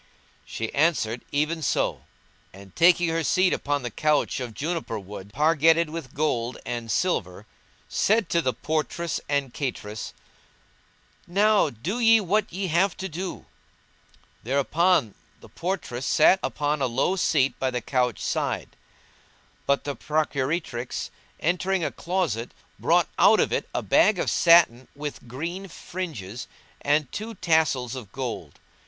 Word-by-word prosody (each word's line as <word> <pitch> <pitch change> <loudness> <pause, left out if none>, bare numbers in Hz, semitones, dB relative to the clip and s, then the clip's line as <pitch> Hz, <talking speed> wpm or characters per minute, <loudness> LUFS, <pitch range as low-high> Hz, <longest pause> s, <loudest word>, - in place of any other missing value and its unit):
"[FN#176] - - -33
She 115 0 -4
answered, 140 -7 +1
"Even 155 +3 0
so"; 130 - 0 0.5
and, 95 -1 -14
taking 175 0 +5
her 165 0 0
seat 185 +4 +3
upon 145 -2 -1
the 120 - -4
couch 150 +6 +1
of 120 -4 -6
juniper 160 -7 -3
wood, 100 0 -9
pargetted 160 +4 +3
with 160 -6 -7
gold 130 -5 -1
and 120 -1 -4
silver, 100 - -1 0.4
said 220 +1 +2
to 170 - +2
the 130 - +1
portress 160 +4 -2
and 140 -3 0
cateress, 110 -6 -5 1.1
"Now 205 0 +3
do 160 - -4
ye 225 -1 +6
what 210 +2 0
ye 190 +3 -3
have 175 +4 +2
to 190 - -4
do." 180 +2 -6 1.0
Thereupon 140 - +2 0.3
the - - -15
portress 165 -9 -4
sat 185 +5 +5
upon 145 0 -1
a 130 - +2
low 130 +10 +1
seat 145 -7 +1
by 130 - +1
the 125 -1 -2
couch 125 -1 0
side; - - -2 0.9
but 140 0 +2
the 145 -1 -3
procuratrix, 150 -4 -2 0.3
entering 180 +2 0
a - - -1
closet, 170 - -2 0.2
brought - - +3
out - - +6
of - - +1
it - - -2
a - - -2
bag - - +4
of - - 0
satin 165 -8 +5
with 145 -3 -6
green 170 +10 -5
fringes 150 - -6 0.3
and 145 -2 +1
two 220 +2 -5
tassels 155 -7 +1
of 120 -8 -8
gold. 120 - -5
150 Hz, 140 wpm, -25 LUFS, 125-170 Hz, 1.1 s, ye